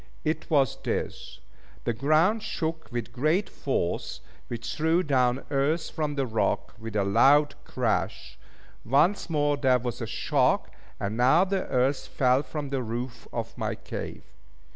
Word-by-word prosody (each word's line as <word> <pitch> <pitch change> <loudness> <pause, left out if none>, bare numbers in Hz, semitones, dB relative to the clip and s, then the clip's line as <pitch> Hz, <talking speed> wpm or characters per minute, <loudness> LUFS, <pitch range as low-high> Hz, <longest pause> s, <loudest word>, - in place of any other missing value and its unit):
It 155 0 -2
was 140 -6 +2
this - - -4 0.4
the 120 - 0
ground 155 - +3
shook 160 -6 -3
with 120 0 -4
great 155 - +1
force, 110 -11 -2 0.3
which 120 -1 -5
threw 160 +3 +2
down 130 -3 +1
earth 145 +4 +1
from 150 -2 -2
the 135 -1 0
rock 110 -2 -1
with 110 -1 -7
a 100 - +2
loud 135 +9 +5
crash - - -2 0.4
once 165 - +2
more 145 -2 +1
there 130 -3 +4
was 120 -2 -4
a - - -3
shock - - +1 0.3
and 100 +2 -2
now 130 +9 +5
the 195 -1 -1
earth 130 +2 +1
fell 130 0 +3
from 150 -2 -5
the 135 -2 0
roof 120 +1 -5
of - - -4
my - - -1
cave. - - -7
135 Hz, 150 wpm, -27 LUFS, 120-155 Hz, 0.4 s, loud